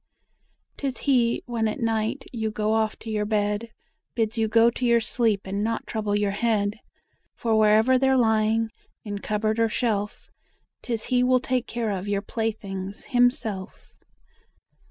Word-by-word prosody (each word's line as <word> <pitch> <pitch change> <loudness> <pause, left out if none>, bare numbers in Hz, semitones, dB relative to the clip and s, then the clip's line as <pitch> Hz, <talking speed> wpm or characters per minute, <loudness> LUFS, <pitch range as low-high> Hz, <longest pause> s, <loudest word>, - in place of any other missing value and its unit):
'Tis 270 -4 -3
he 245 -4 +2
when 230 -2 -1
at 215 - -3
night; 225 +3 -1
you 220 -2 -1
go 215 0 -1
off 220 -1 0
to 225 - -7
your 210 -1 0
bed, 210 +1 -1 0.5
Bids 225 -2 0
you 225 -1 +1
go 230 +2 +5
to 250 - -6
your 235 -1 +4
sleep 225 -2 +1
and 200 +2 -2
not 230 +1 -2
trouble 210 -2 -2
your 205 -1 +1
head; 210 0 0 0.6
For 225 -2 0
wherever 220 +4 +4
they're 265 0 +3
lying, 220 -1 +2 0.3
in 205 -1 -4
cupboard 215 +2 -1
or 225 0 +3
shelf, 210 -3 -2 0.5
'Tis 230 -3 -3
he 250 - +4
will 255 0 +4
take 250 -1 -1
care 235 -3 -2
of 195 0 -4
your 200 -1 -1
playthings 200 -3 -4
himself! 235 -6 0
220 Hz, 155 wpm, -25 LUFS, 210-235 Hz, 0.6 s, go